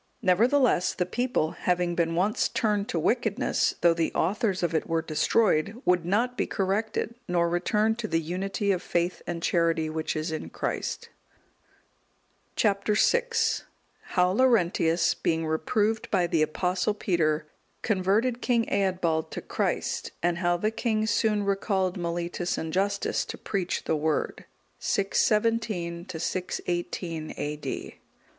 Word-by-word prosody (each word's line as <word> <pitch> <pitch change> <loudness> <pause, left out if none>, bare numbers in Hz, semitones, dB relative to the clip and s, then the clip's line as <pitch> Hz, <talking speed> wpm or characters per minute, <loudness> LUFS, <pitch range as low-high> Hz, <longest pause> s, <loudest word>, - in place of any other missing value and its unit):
Nevertheless, 230 +2 +3
the 180 - 0
people, 230 -5 0
having 180 -1 0
been 165 -1 0
once 195 +5 +1
turned 215 -5 0
to - - -1
wickedness, 230 - +1
though 170 -1 +5
the 165 -1 0
authors 195 +1 0
of 170 -1 0
it 160 - 0
were 165 -1 0
destroyed, 190 +5 +1
would 180 -2 +3
not 235 +6 +1
be - - -1
corrected, 210 +4 -1
nor 175 -2 +2
return 210 +6 +1
to 235 -2 -3
the 165 -4 +1
unity 195 +5 -1
of 180 -2 0
faith 175 0 -1
and 170 -1 -4
charity 165 -2 +1
which 160 0 -2
is 155 +1 -2
in 155 - -4
Christ. - - -3 1.5
Chap. 200 -2 +2
VI. 470 - +3 0.9
How 180 -1 +4
Laurentius, 180 -8 +3
being 165 -1 -1
reproved 205 +8 0
by 185 -3 +2
the 165 -2 +1
Apostle 180 +6 0
Peter, 160 -6 0 0.4
converted 220 +4 +1
King 235 -2 +2
Eadbald 180 -5 +1
to - - -5
Christ; - - -2
and 175 0 +1
how 175 -1 +2
the 215 +5 0
king 225 -1 0
soon 215 -1 +1
recalled 195 -2 0
Mellitus 175 0 -2
and 160 -1 -4
Justus 200 +1 0
to - - -7
preach 190 -4 -2
the 160 - 0
Word. 155 0 -1 0.3
[617 210 -4 0
618 175 -1 -3
A.D. 150 0 -5
180 Hz, 135 wpm, -27 LUFS, 170-215 Hz, 1.5 s, though